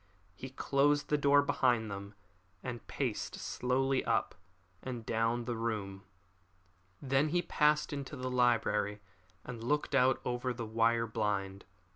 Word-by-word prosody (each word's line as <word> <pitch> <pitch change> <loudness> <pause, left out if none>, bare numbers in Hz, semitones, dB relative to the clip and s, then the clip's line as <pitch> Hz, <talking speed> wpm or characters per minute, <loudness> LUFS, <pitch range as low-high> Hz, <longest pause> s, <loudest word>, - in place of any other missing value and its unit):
He 130 - -8
closed 145 +2 +1
the 150 - +3
door 145 0 +5
behind 120 -6 +1
them 100 +1 -7 0.5
and 120 -4 -6
paced 125 -7 -3
slowly 125 +8 0
up 115 - 0 0.5
and 120 -3 -6
down 115 +2 0
the 120 -1 -2
room. 105 -4 -3 0.9
Then 135 +2 +1
he 175 +2 +1
passed 150 0 +2
into 140 0 -5
the 130 -1 -4
library 115 -4 +2 0.4
and 120 -2 -7
looked 145 +4 0
out 130 -1 +4
over 125 0 -2
the 115 -1 -4
wire 115 +1 +2
blind. 100 -3 -2
120 Hz, 135 wpm, -32 LUFS, 110-135 Hz, 0.9 s, door